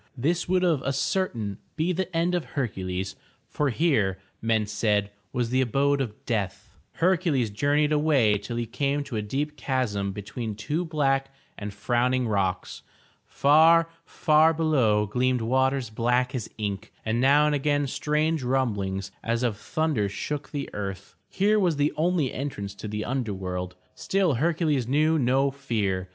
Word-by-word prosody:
This 170 +8 0
would 185 0 +2
of 165 -7 +2
a 140 - -1
certain 135 - -1 0.2
be 165 +3 0
the 185 +1 -2
end 170 +2 +1
of 175 -2 0
Hercules, 95 -7 -2 0.3
for 145 -1 0
here, 115 - +1 0.2
men 110 -1 +1
said, 105 -1 0 0.2
was 120 -1 -1
the 130 +1 +3
abode 140 +3 +2
of 110 -5 -6
death. 105 -6 -3 0.2
Hercules 165 - +1
journeyed 145 +7 +1
away 140 -9 +3
till 105 +4 -6
he 120 - -1
came 140 +5 -1
to 130 - -7
a 105 - 0
deep 140 +8 -3
chasm 105 -7 -1
be 100 +1 -7
tween 110 +1 -5
two 145 - -2
black 135 -4 0 0.2
and 105 0 -6
frowning 120 +4 0
rocks. 100 -4 -1 0.5
Far, 165 +3 +5
far 160 -1 +3
below 130 -10 +2
gleamed 125 +3 0
waters 130 0 +1
black 125 +3 +1
as 125 -5 -4
ink 100 -3 -4
and 115 +2 0
now 145 +3 +5
and 150 - +2
again 145 0 +1
strange 150 +3 0
rumblings 100 -7 -1
as 115 +1 0
of 120 -4 +1
thunder 125 -2 -1
shook 145 +8 -4
the 140 -2 -4
earth. 95 -2 -5 0.2
Here 210 +2 +2
was 180 -5 +2
the 145 +1 +1
only 160 -4 +1
entrance 100 -8 -4
to 105 - -8
the 105 +1 -3
under 120 -6 -2
world. 90 -1 -4 0.2
Still 190 -5 +1
Hercules 150 -2 +1
knew 155 +4 +3
no 135 +2 +2
fear. 105 -9 -2
130 Hz, 160 wpm, -26 LUFS, 105-150 Hz, 0.5 s, Far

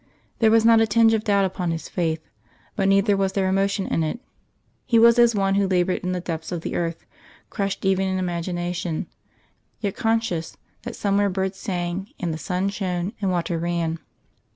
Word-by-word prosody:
There 225 -2 +5
was 225 0 +4
not 230 -1 +6
a 225 - +3
tinge 225 +1 +4
of 220 -1 +1
doubt 200 -2 +3
upon 180 -2 -2
his 165 -1 -3
faith, 160 -3 -2 0.5
but 195 -2 +1
neither 195 +1 +4
was 195 -1 0
there 195 -2 +1
emotion 195 +1 +1
in - - 0
it. 160 +9 -2 0.6
He 230 - +2
was 235 +1 +6
as 235 -1 +5
one 195 -1 +1
who 200 0 +2
laboured 185 -1 +1
in 180 - -3
the 180 - -1
depths 165 -1 -5
of 175 -2 -3
the - - -4
earth, 165 -1 -3 0.5
crushed 200 -2 -3
even 190 0 +2
in 190 0 -1
imagination, 175 -1 -3 0.7
yet 200 -3 -2
conscious 225 -7 -1 0.2
that 240 -1 -7
somewhere 200 0 +1
birds 190 0 -2
sang, 180 0 -3
and 170 -3 -2
the 155 - -5
sun 180 +5 -1
shone, 185 -1 -3
and 195 - +1
water 175 -2 -1
ran. 165 -1 -1
190 Hz, 190 wpm, -23 LUFS, 175-200 Hz, 0.7 s, not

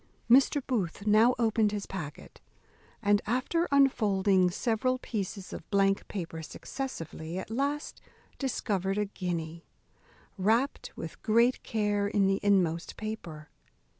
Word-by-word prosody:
Mr. 270 +3 +5
Booth 200 - -2
now 220 +4 +5
opened 220 -2 +2
his 205 -1 -3
packet, 160 -7 -8 0.6
and, 205 0 +4
after 265 +9 0
unfolding 200 -9 +3
several 240 +6 0
pieces 200 -5 -5
of - - -9
blank 195 -1 +2
paper 165 -4 -5
successively, 165 - -6
at 190 - -6
last 280 +5 -2 0.4
discovered 200 -7 -1
a 210 - +1
guinea, 170 -4 -4 0.8
wrapt 230 +8 +1
with - - -8
great 235 +3 +3
care 205 -2 0
in 205 -1 +2
the 195 0 +2
inmost 180 -5 +1
paper. 170 -9 -6
205 Hz, 120 wpm, -29 LUFS, 185-235 Hz, 0.8 s, Mr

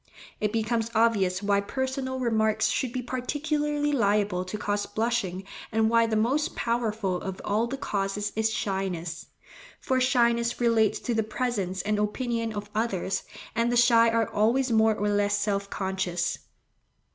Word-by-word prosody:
It 210 -1 0
becomes 225 +1 0
obvious 205 -4 +2
why 200 0 +2
personal 260 +4 -3
remarks 220 -3 +2
should 255 - -1
be 250 0 -3
particularly 295 +3 -1
liable 205 -7 +1
to 185 +3 -5
cause 205 -1 -1
blushing, 210 -4 -1 0.3
and 220 0 +2
why 230 0 +4
the 220 - -1
most 275 +9 +1
powerful 220 -5 -1
of 190 -1 -5
all 215 +3 +1
the 270 +3 -4
causes 205 -3 -2
is 220 0 +1
shyness; 180 -6 -3 0.5
for 260 -2 0
shyness 235 -2 +2
relates 220 -3 +3
to 240 - -1
the 220 - +2
presence 210 -5 -2
and 210 0 0
opinion 230 +2 -1
of 205 -1 -6
others, 205 -4 -1 0.3
and 230 +1 +1
the 240 - +2
shy 230 -1 +6
are 225 -1 +1
always 240 +5 +1
more 220 -1 +4
or 210 0 -1
less 205 0 +2
self 200 -1 -1
conscious. 190 -3 -2
220 Hz, 155 wpm, -27 LUFS, 205-240 Hz, 0.5 s, shy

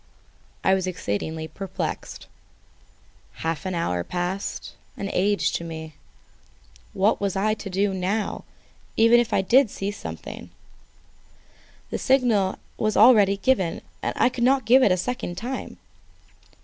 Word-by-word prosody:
I 190 - +4
was 190 -1 0
exceedingly 160 - -3
perplexed. 190 +4 -5 1.2
Half 165 +1 -2
an 185 - -2
hour 90 - -1
passed, 180 - -4 0.3
an 200 0 -4
age 200 +2 +2
to - - -2
me. 160 -1 -7 1.0
What 200 +3 +2
was 200 -2 -1
I 210 +3 +1
to 205 -2 -7
do 195 +1 0
now, 190 +3 -2 0.5
even 230 +2 +6
if 240 - 0
I 190 - +2
saw 210 -3 +2
something? 205 - -8 1.4
The - - -2
signal 235 -8 +2 0.2
once 215 -1 0 0.5
given 190 -11 +1 0.2
I - - +1
could 245 -1 -3
not 265 0 +3
give 255 +4 +6
it 215 - +5
a 180 - +3
second 185 -3 -3
time. 255 +5 -5
195 Hz, 125 wpm, -24 LUFS, 180-230 Hz, 1.4 s, even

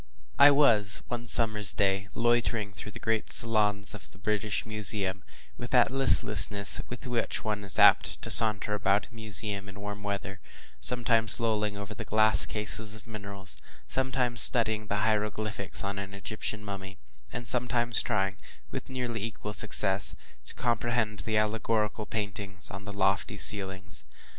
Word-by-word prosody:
I 140 +1 +8
was 115 -8 +2
one 120 -1 -6
summer’s 110 -4 +2
day 95 0 -1
loitering 115 -3 -1
through 105 +1 -10
the - - -9
great 110 -1 -3
saloons 105 -3 +2
of 105 - -10
the - - -9
British 105 +1 -3
Museum, 100 -3 +3 0.4
with 120 - -7
that 125 -1 +2
listlessness 105 -7 +4
with 125 +3 -9
which 120 -2 -3
one 105 -2 -4
is 95 -2 0
apt - - +3
to - - -2
saunter 105 -2 +6
about 100 -1 -1
a - - -24
museum 105 -3 -1
in 100 +1 -12
warm 105 0 -8
weather; 100 0 -6 0.4
sometimes 115 -2 +1
lolling 105 -3 -2
over 100 +2 -8
the - - -8
glass 110 +1 +2
cases 105 +1 -3
of 110 - -11
minerals, 100 -3 -7 0.3
sometimes 125 -2 0
studying 110 -3 +4
the 105 +2 -2
hieroglyphics 105 -2 -1
on 100 0 -5
an 100 0 -8
Egyptian 105 +1 -6
mummy, 95 -1 -9 0.3
and 120 -1 -6
some 125 0 +1
times 120 -1 +4
trying, 95 -4 -3 0.3
with - - -8
nearly 125 -4 -5
equal 105 -1 -7
success, 100 -2 +2 0.3
to - - -6
comprehend 115 -2 -2
the 110 +1 -3
allegorical 110 0 -2
paintings 100 -3 -6
on 100 +1 -10
the 100 - -8
lofty 100 0 -2
ceilings. 95 -1 +3
105 Hz, 155 wpm, -27 LUFS, 100-115 Hz, 0.4 s, I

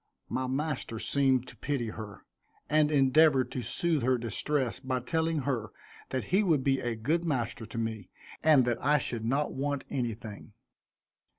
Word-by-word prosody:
My 130 0 -1
master 135 -3 -2
seemed 130 +1 +2
to - - -11
pity 135 -6 -2
her, 110 -2 -9 0.4
and 150 0 +3
endeavored 135 -2 +4
to 130 - -3
soothe 165 +4 0
her 130 +1 +2
distress 125 +2 -1
by 130 -1 -2
telling 160 +4 0
her 125 -6 -2 0.4
that 130 - -2
he 195 - +6
would 160 -9 +2
be 135 -1 +2
a 120 -1 -2
good 150 +10 0
master 120 -8 -2
to 115 - -8
me, 110 -4 -3 0.3
and 150 -5 +5
that 120 -1 -1
I 150 +2 +4
should 120 -4 -3
not 140 +5 0
want 140 0 -2
anything. 110 -4 -4
130 Hz, 165 wpm, -30 LUFS, 120-150 Hz, 0.4 s, he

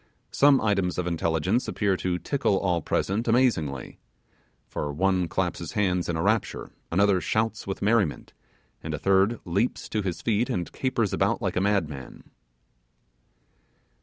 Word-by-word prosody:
Some 140 -1 +5
items 95 -4 0
intelligence 85 +5 0
appear 100 -3 0
to 90 -1 -1
tickle 100 - 0
all 90 -3 0
present 100 +9 -1
amazingly; 110 - +1 0.7
for 75 - -4
one 90 +3 +1
claps 90 +1 -1
his 85 - -6
hands 90 -4 0
in 85 - -1
a 80 - -1
rapture; 110 +2 0 0.2
another 95 +1 +3
shouts 110 -1 -1
with 95 - -4
merriment; 105 -7 +1 0.5
and - - -4
a - - -4
third 100 +4 +2
leaps 100 +8 -1
to 105 - -1
his 95 -4 -4
feet 115 +3 +1
and 90 -9 -2
capers 120 -6 -1
about - - +1
like - - -2
a 90 - +1
madman. 80 -10 -2
95 Hz, 145 wpm, -26 LUFS, 85-110 Hz, 0.7 s, Some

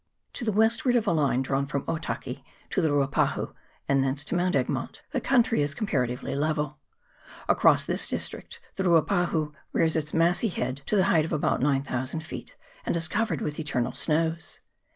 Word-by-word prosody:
To - - -5
the 220 - +1
westward 230 +5 +3
of 235 -2 +2
a 200 - +2
line 140 -5 +2
drawn 135 +1 0
from 140 -1 -2
Otaki 165 0 -4 0.3
to 190 - +1
the 160 - +2
Ruapahu, 140 -1 +1 0.3
and 135 -1 +3
thence 135 +2 -1
to - - -2
Mount 180 +1 +1
Egmont, - - -2
the - - -1
country 240 - +3
is 145 -1 -1
comparatively 125 - -1
level. 150 0 -1 0.7
Across - - +4
this - - 0
district - - -5 0.2
the 190 - 0
Ruapahu 165 -2 +2 0.2
rears 160 -1 +2
its 150 -2 0
massy 170 +6 +2
head 130 -6 -2
to - - +1
the 190 - +5
height 170 -5 +3
of - - -6
about 150 -5 +1
9000 135 +1 0
feet, 160 - -8 0.3
and - - 0
is 170 0 +1
covered 220 +4 -1
with 150 +1 -3
eternal 135 -6 -1
snows. 160 +1 -1
155 Hz, 175 wpm, -27 LUFS, 140-180 Hz, 0.7 s, the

